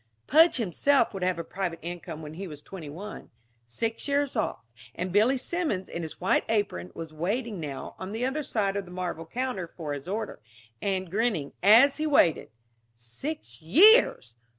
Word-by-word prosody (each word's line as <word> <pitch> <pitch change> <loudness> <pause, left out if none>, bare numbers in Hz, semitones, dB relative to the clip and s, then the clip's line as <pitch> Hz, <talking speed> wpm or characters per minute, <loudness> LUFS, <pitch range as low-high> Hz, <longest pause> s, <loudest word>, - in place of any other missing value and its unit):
Pudge 320 +4 +6
himself 235 - +2
would 195 - -5
have 180 -1 +1
a 170 - -3
private 180 -1 -4
income 170 -2 -6
when 150 0 -8
he 190 +4 -6
was 150 -3 -8
twenty 160 0 -9
one. 200 +8 -8 0.4
Six 225 - -3
years 285 -1 0
off... 215 - -2 0.3
and 180 +1 -3
Billy 220 +8 +4
Simmons 295 - -2
in 170 - -5
his 160 -2 -7
white 185 - +2
apron, 205 - -1
was 160 -1 -7
waiting 205 +6 -2
now, 145 -4 -6
on 190 +1 -6
the 225 +3 -2
other 270 +4 -1
side 210 -8 -1
of 200 -1 -2
the - - -13
marble 180 -3 -4
counter, 245 -5 -3
for 160 -3 -6
his 145 +2 -7
order 215 +2 -4 0.4
and 190 -3 -2
grinning 205 -9 0
as 230 +8 +7
he 310 0 -1
waited. 185 - +3 0.5
Six 120 - -7
years! 325 - +6
195 Hz, 175 wpm, -27 LUFS, 165-245 Hz, 0.5 s, as